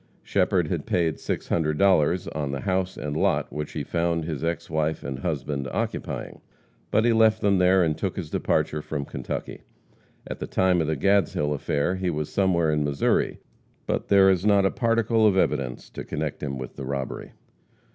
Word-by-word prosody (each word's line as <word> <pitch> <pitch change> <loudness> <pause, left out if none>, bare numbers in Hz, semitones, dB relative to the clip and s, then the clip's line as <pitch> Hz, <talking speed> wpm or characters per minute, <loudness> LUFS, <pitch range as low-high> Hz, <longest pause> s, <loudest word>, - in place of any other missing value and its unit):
Shepherd - - +1
had - - -3
paid 80 -4 +1
$600 85 +1 +1
on 75 -3 -2
the 70 -1 -4
house 95 -1 -1
and 75 -1 -4
lot - - +1
which 75 -1 -5
he - - -3
found 85 -1 -1
his 80 -2 -4
ex 85 -1 -2
wife 80 0 -1
and 65 -2 -5
husband 70 -3 -3
occupying. - - -4 0.5
But 110 - +2
he 120 - +4
left 110 -1 +4
them 100 -3 +3
there 90 0 +5
and 80 -2 +1
took - - -3
his - - -5
departure 75 - 0
from 75 -2 -4
Kentucky. - - -5 0.6
At - - -6
the - - -4
time 90 -2 +2
of 80 - -1
the 80 -1 -1
Gadshill 80 -4 +2
affair 75 +5 -1
he 95 -1 -1
was 75 -2 -2
somewhere 85 -5 +2
in 75 -1 +1
Missouri. 70 -1 0 0.4
But - - -2
there 95 -1 +6
is 90 -1 0
not 100 -2 +4
a 95 - +2
particle 115 -1 +2
of 95 -2 +3
evidence 70 -8 0
to - - -6
connect - - -4
him 70 -2 -3
with 65 -1 -8
the 70 - -5
robbery. 70 0 -4
85 Hz, 185 wpm, -25 LUFS, 75-95 Hz, 0.6 s, there